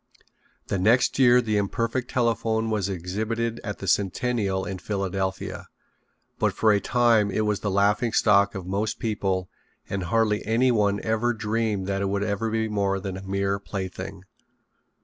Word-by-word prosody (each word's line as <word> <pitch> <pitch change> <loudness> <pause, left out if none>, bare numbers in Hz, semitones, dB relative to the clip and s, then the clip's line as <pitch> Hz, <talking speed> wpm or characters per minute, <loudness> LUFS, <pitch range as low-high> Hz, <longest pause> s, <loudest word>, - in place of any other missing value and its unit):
The 100 - -2
next 115 +8 +3
year 125 -1 +6
the 110 -3 0
imperfect 115 +5 -1
telephone 115 -2 0
was 100 -3 0
exhibited 110 +6 -3
at 105 -2 -4
the 95 - -7
Centennial 100 0 0
in 95 -2 -5
Philadelphia, 95 -1 -3 0.7
but - - +2
for 110 - +4
a 100 - +3
time 115 -4 +3
it 110 - 0
was 105 -1 0
the 105 - -2
laughing 100 +4 +2
stock 100 -2 +3
of 95 -2 -5
most 100 +4 -2
people 95 -4 -1 0.4
and 95 -2 -3
hardly 105 +2 +1
anyone 110 -4 +2
ever 110 +2 +1
dreamed 110 -2 -1
that 100 0 -1
it 100 - 0
would 100 0 -1
ever 105 +2 -1
be 110 0 0
more 100 -2 0
than 95 -1 -5
a 95 - -7
mere 100 +1 -1
plaything. 95 -1 -6
105 Hz, 160 wpm, -25 LUFS, 95-115 Hz, 0.7 s, year